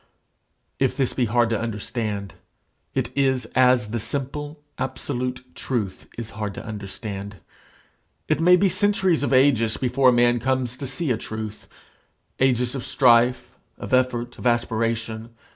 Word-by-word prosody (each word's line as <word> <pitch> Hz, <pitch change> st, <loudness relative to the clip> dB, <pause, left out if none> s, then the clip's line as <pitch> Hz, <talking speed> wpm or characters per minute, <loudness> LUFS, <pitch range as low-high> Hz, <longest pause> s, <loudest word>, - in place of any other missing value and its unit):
If 135 Hz, -2 st, +1 dB
this 135 Hz, -3 st, 0 dB
be 125 Hz, -, +1 dB
hard 115 Hz, +1 st, +2 dB
to 110 Hz, -, +1 dB
understand, 105 Hz, -2 st, -3 dB, 0.6 s
it -, -, -2 dB
is 135 Hz, -2 st, +2 dB
as 125 Hz, -4 st, +4 dB
the 120 Hz, -, -1 dB
simple, 145 Hz, +5 st, -4 dB, 0.2 s
absolute 130 Hz, -1 st, -3 dB
truth 110 Hz, -7 st, -3 dB
is 115 Hz, -2 st, -5 dB
hard 105 Hz, 0 st, -4 dB
to -, -, -8 dB
understand. 100 Hz, -1 st, -6 dB, 0.9 s
It -, -, +1 dB
may 180 Hz, +2 st, +6 dB
be 195 Hz, +2 st, +3 dB
centuries 190 Hz, -2 st, +2 dB
of 145 Hz, -, -1 dB
ages 130 Hz, -4 st, +4 dB
before 130 Hz, +1 st, +3 dB
a -, -, +6 dB
man 120 Hz, 0 st, +3 dB
comes 130 Hz, 0 st, -1 dB
to 135 Hz, -, -5 dB
see 135 Hz, +2 st, -2 dB
a 115 Hz, -, +1 dB
truth 110 Hz, -1 st, -7 dB, 0.7 s
ages 125 Hz, -2 st, +2 dB
of 135 Hz, -3 st, -4 dB
strife, 125 Hz, -1 st, +3 dB, 0.3 s
of -, -, -6 dB
effort, 120 Hz, -2 st, +1 dB
of -, -, -1 dB
aspiration. 115 Hz, -1 st, -1 dB
120 Hz, 145 wpm, -23 LUFS, 110-130 Hz, 0.9 s, may